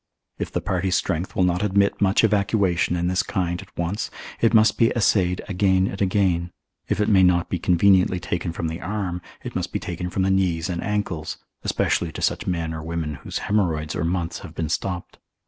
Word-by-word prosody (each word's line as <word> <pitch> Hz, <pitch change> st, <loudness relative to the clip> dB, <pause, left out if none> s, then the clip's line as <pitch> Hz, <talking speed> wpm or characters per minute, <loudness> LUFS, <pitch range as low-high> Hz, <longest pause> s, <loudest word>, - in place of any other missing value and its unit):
If -, -, -3 dB
the -, -, -1 dB
party's 95 Hz, 0 st, 0 dB
strength 90 Hz, 0 st, -1 dB
will 95 Hz, -, +3 dB
not 90 Hz, 0 st, +1 dB
admit 100 Hz, 0 st, +2 dB
much 100 Hz, +2 st, +3 dB
evacuation 100 Hz, -5 st, +2 dB
in 85 Hz, 0 st, -1 dB
this 90 Hz, 0 st, +2 dB
kind 90 Hz, -1 st, -2 dB
at 100 Hz, -, -14 dB
once, 85 Hz, +5 st, -2 dB, 0.3 s
it 115 Hz, -, +3 dB
must 110 Hz, -1 st, +4 dB
be 115 Hz, -, +5 dB
assayed 95 Hz, -5 st, +2 dB
again 95 Hz, -1 st, +2 dB
and 100 Hz, +1 st, -4 dB
again: 90 Hz, -3 st, +1 dB, 0.4 s
if -, -, 0 dB
it 105 Hz, -, +2 dB
may 100 Hz, -4 st, +5 dB
not 90 Hz, -1 st, +3 dB
be 90 Hz, -, 0 dB
conveniently 90 Hz, +1 st, +4 dB
taken 85 Hz, -1 st, -3 dB
from 85 Hz, 0 st, -3 dB
the 80 Hz, +2 st, -5 dB
arm, 95 Hz, -3 st, -3 dB, 0.2 s
it -, -, -7 dB
must -, -, -2 dB
be -, -, -1 dB
taken 90 Hz, +1 st, -4 dB
from 95 Hz, +1 st, -1 dB
the 95 Hz, -, +2 dB
knees 90 Hz, -2 st, +1 dB
and 85 Hz, -, -3 dB
ankles, 100 Hz, -6 st, -2 dB, 0.2 s
especially 85 Hz, -, 0 dB
to -, -, -6 dB
such -, -, 0 dB
men 85 Hz, -3 st, -1 dB
or 80 Hz, -, -5 dB
women 80 Hz, -1 st, -3 dB
whose -, -, -4 dB
haemorrhoids 80 Hz, -7 st, 0 dB
or -, -, -1 dB
months 85 Hz, 0 st, -1 dB
have -, -, -11 dB
been 80 Hz, -2 st, -2 dB
stopped. 90 Hz, +1 st, -3 dB
90 Hz, 205 wpm, -23 LUFS, 85-100 Hz, 0.4 s, be